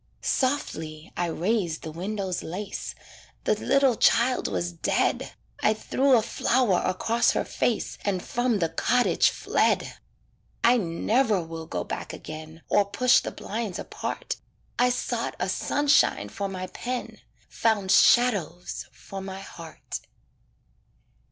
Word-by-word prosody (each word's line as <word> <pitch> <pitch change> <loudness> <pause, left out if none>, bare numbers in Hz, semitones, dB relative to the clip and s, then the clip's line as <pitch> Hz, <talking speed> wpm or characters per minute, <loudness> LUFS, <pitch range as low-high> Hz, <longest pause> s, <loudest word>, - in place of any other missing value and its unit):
Softly 160 - -1
I 175 - 0
raised 175 -1 -1
the 160 - -5
window's 190 +2 -3
lace 195 +4 -5 0.5
The - - +3
little 265 +3 +3
child 250 +3 +3
was 90 -2 -2
dead 85 - 0 0.3
I 215 - +3
threw 265 +4 +3
a 220 - +2
flower 235 -4 +2
across 230 +5 +2
her - - 0
face, 230 - -1
And 190 -3 -1
from 245 -2 0
the 165 -4 0
cottage 245 +9 +3
fled. - - 0 0.6
I 245 +2 +6
never 210 +2 +1
will 160 0 -7
go 90 -1 -3
back - - -5
again 155 +1 -9
Or 205 - +3
push 245 +6 +4
the - - -4
blinds 215 -3 -4
apart - - -4 0.4
I 250 0 +5
sought 245 -1 -2
a 180 - 0
sunshine 290 +9 +2
for 200 -2 -4
my 185 -1 -4
pen, 245 +6 -5 0.3
Found 210 -4 +1
shadows 200 - +3
for 195 +9 -9
my 190 0 -6
heart. 165 -4 -8
200 Hz, 130 wpm, -26 LUFS, 170-240 Hz, 0.6 s, I